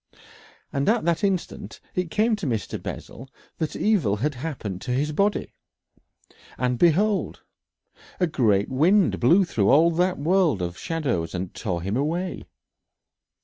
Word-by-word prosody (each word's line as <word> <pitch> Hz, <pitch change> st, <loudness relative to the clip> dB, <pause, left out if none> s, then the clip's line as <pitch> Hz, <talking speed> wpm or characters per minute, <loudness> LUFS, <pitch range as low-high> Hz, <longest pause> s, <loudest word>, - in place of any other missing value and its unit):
And 140 Hz, +4 st, +1 dB
at 225 Hz, -3 st, +2 dB
that 170 Hz, +3 st, 0 dB
instant 195 Hz, -3 st, -2 dB
it 180 Hz, -2 st, -2 dB
came 220 Hz, +5 st, +2 dB
to 195 Hz, -, -4 dB
Mr. 110 Hz, -7 st, -3 dB
Bessel 130 Hz, +3 st, -8 dB, 0.3 s
that 160 Hz, -2 st, -2 dB
evil 175 Hz, -, +2 dB
had 145 Hz, +8 st, -1 dB
happened 120 Hz, -, -5 dB
to 125 Hz, -, -4 dB
his 145 Hz, +4 st, 0 dB
body, 200 Hz, +7 st, 0 dB, 1.0 s
and 125 Hz, -1 st, -1 dB
behold! 195 Hz, +5 st, +2 dB, 0.8 s
a 180 Hz, -, +3 dB
great 110 Hz, -, +2 dB
wind 175 Hz, +9 st, +3 dB
blew 175 Hz, +11 st, +5 dB
through 105 Hz, -, +1 dB
all 160 Hz, +5 st, +5 dB
that 180 Hz, +2 st, +1 dB
world 160 Hz, -, +2 dB
of 85 Hz, 0 st, -4 dB
shadows 125 Hz, -, -2 dB
and 90 Hz, 0 st, -4 dB
tore 90 Hz, -6 st, -3 dB
him 100 Hz, +3 st, -2 dB
away. 165 Hz, +7 st, -2 dB
150 Hz, 145 wpm, -24 LUFS, 120-180 Hz, 1.0 s, blew